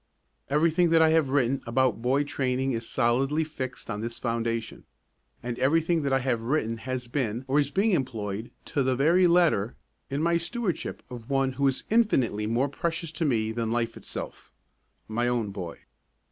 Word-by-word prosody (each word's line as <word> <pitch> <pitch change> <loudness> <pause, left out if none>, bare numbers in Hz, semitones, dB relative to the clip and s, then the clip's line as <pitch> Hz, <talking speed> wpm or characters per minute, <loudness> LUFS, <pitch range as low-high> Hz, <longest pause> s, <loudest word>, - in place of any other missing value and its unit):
Everything 165 +4 +3
that 165 0 +5
I 160 - +5
have 160 -3 +3
written 135 -1 +1
about 125 0 +1
boy 130 +4 +2
training 130 -2 -1
is 115 -2 -3
solidly 135 +5 +1
fixed 130 -5 -6
on 105 -2 -4
this 115 +1 -4
foundation; 115 -1 -2 0.6
and 120 -1 -4
everything 165 +4 +2
that 140 -2 -1
I 135 0 +3
have 125 -3 0
written 115 -2 0
has 125 +1 -4
been 120 -1 -2
or 135 +3 +3
is 140 -2 +1
being 200 +7 +2
employed, 110 - -2 0.2
to 145 - +2
the 130 -1 +2
very 170 +7 +4
letter, 170 - +3 0.3
in 140 +3 -1
my 170 0 +3
stewardship 185 +1 -3
of 120 -2 -9
one 135 -1 +2
who 140 +2 +1
is 135 - 0
infinitely 130 - +2
more 120 +5 +1
precious 165 +3 -3
to 165 0 -2
me 110 -6 +1
than 115 0 -2
life 115 -1 -1
itself - - -7 0.6
my 120 +3 0
own 120 -4 0
boy. 90 -4 -7
130 Hz, 175 wpm, -27 LUFS, 115-155 Hz, 0.6 s, that